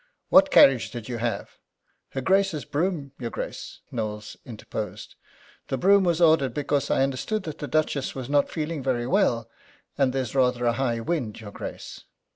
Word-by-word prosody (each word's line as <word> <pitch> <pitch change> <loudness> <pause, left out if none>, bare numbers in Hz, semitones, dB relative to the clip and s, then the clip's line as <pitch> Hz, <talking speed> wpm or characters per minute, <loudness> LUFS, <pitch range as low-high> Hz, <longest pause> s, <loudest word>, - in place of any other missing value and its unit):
"What 285 0 +7
carriage 135 - +6
did 120 -3 -7
you 120 -2 -4
have?" 115 -3 -3 0.5
"Her 135 - -2
Grace's 190 0 +1
brougham, 150 -1 -2
your 120 -2 -3
Grace." - - -7
Knowles 105 -2 -4
interposed: 105 -3 -6 0.5
"The 135 - -2
brougham 195 +6 +5
was 170 -2 +1
ordered 160 -6 +4
because 145 -1 0
I - - +3
understood 135 +10 -2
that 155 -4 -7
the 145 - -4
Duchess 150 -3 0
was 130 -2 -5
not 145 0 +2
feeling 155 -1 -3
very 125 -2 -1
well, 120 - +1 0.5
and 135 -2 +3
there's 130 -4 -3
rather 125 -2 +2
a 120 - +3
high 120 -2 -1
wind, 120 -6 -2
your 105 -2 -9
Grace." - - -8
135 Hz, 170 wpm, -25 LUFS, 120-155 Hz, 0.5 s, What